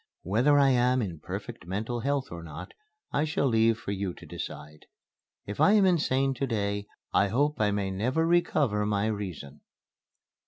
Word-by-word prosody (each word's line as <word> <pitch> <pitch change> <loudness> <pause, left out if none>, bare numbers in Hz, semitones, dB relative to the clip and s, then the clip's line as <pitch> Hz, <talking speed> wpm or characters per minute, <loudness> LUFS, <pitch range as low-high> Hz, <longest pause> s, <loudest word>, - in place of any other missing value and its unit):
Whether 125 - +3
I 140 -1 +5
am 125 0 +3
in 85 -6 -5
perfect 85 - -7
mental 110 +6 -3
health 140 +2 -1
or 85 0 -6
not, 80 -3 -9 0.4
I 145 - +1
shall 155 -2 0
leave 115 -2 +3
for 110 -3 -6
you 100 -2 -3
to - - -13
decide. 75 -2 -8 0.6
If 105 - -4
I 205 - +6
am 205 -2 +5
insane 135 -7 +2
to 135 +2 -2
day 100 -3 -2 0.3
I 100 - +4
hope 140 +6 0
I 105 - +3
may 100 -1 -1
never 125 +12 0
recover 150 -10 +2
my 105 0 +1
Reason." 95 -10 -5
110 Hz, 170 wpm, -28 LUFS, 100-135 Hz, 0.6 s, I